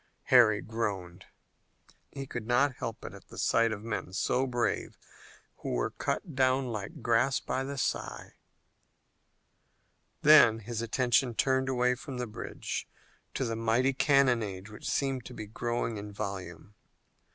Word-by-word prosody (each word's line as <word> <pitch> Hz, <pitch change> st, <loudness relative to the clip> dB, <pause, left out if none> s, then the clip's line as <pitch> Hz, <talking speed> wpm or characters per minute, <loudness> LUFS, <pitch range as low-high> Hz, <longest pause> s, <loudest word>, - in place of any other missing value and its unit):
Harry 110 Hz, -5 st, +7 dB
groaned. 100 Hz, -5 st, -4 dB, 0.8 s
He 135 Hz, -1 st, -6 dB
could 120 Hz, -4 st, -6 dB
not 130 Hz, +2 st, +2 dB
help 115 Hz, -, -5 dB
it -, -, -7 dB
at -, -, -13 dB
the -, -, -13 dB
sight 115 Hz, 0 st, +3 dB
of 105 Hz, -1 st, -5 dB
men 110 Hz, -5 st, -4 dB
so 125 Hz, +7 st, +1 dB
brave 120 Hz, -1 st, -1 dB, 0.6 s
who -, -, -4 dB
were -, -, 0 dB
cut 160 Hz, -, -3 dB
down 130 Hz, 0 st, +2 dB
like 110 Hz, -4 st, -6 dB
grass 120 Hz, +3 st, +3 dB
by 130 Hz, -, -2 dB
the 140 Hz, +1 st, -5 dB
scythe. -, -, -3 dB, 1.9 s
Then 150 Hz, -7 st, +8 dB
his 115 Hz, +1 st, -4 dB
attention 120 Hz, +1 st, +1 dB
turned 130 Hz, +1 st, +2 dB
away 125 Hz, -1 st, +2 dB
from 130 Hz, +1 st, -7 dB
the 125 Hz, -, -2 dB
bridge 110 Hz, -, -5 dB, 0.5 s
to 135 Hz, -, 0 dB
the 115 Hz, -1 st, -2 dB
mighty 115 Hz, +4 st, +2 dB
cannonade 120 Hz, -8 st, +2 dB
which 105 Hz, -, -7 dB
seemed 135 Hz, -3 st, 0 dB
to 125 Hz, -, -9 dB
be 110 Hz, -, -6 dB
growing 115 Hz, +1 st, -2 dB
in 105 Hz, 0 st, -7 dB
volume. 100 Hz, -3 st, -6 dB
120 Hz, 145 wpm, -30 LUFS, 110-130 Hz, 1.9 s, Then